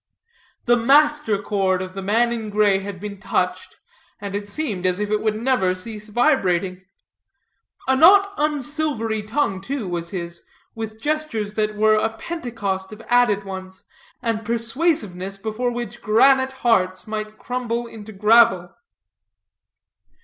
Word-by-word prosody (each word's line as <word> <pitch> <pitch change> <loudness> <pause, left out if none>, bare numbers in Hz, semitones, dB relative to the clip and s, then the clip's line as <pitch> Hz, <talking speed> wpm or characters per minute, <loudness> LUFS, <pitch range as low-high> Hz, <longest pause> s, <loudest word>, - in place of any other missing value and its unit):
The 240 - +5
master 285 -2 +3
chord 195 -2 0
of 185 0 -6
the 195 - -5
man 230 +5 +2
in 220 -2 -4
gray 205 -2 +3
had 195 -1 -7
been 200 0 -7
touched, 195 - -2 0.4
and 200 -2 -6
it 205 0 -4
seemed 205 - -2
as 180 +1 0
if 210 0 -2
it 215 - +1
would 215 -1 0
never 230 -7 +1
cease 210 +2 -6
vibrating. 190 - +1 1.1
A 265 - +4
not 395 +7 +6
unsilvery 295 -6 -1
tongue, 210 -3 -1
too, 255 0 -4
was 170 -1 -4
his, 170 -2 -5 0.3
with 220 -1 -6
gestures 295 -7 -2
that 215 0 -1
were 215 +1 +4
a 220 +1 -1
Pentecost 220 - -4
of 215 +1 -10
added 240 -5 +3
ones, 190 -1 -8 0.4
and 225 -2 -1
persuasiveness 230 - -1
before 220 +4 -2
which 240 -1 -6
granite 260 +4 +4
hearts 185 -5 +2
might 215 0 -5
crumble 240 -1 -3
into 220 -2 -10
gravel. 210 -3 +4
215 Hz, 140 wpm, -22 LUFS, 195-245 Hz, 1.1 s, not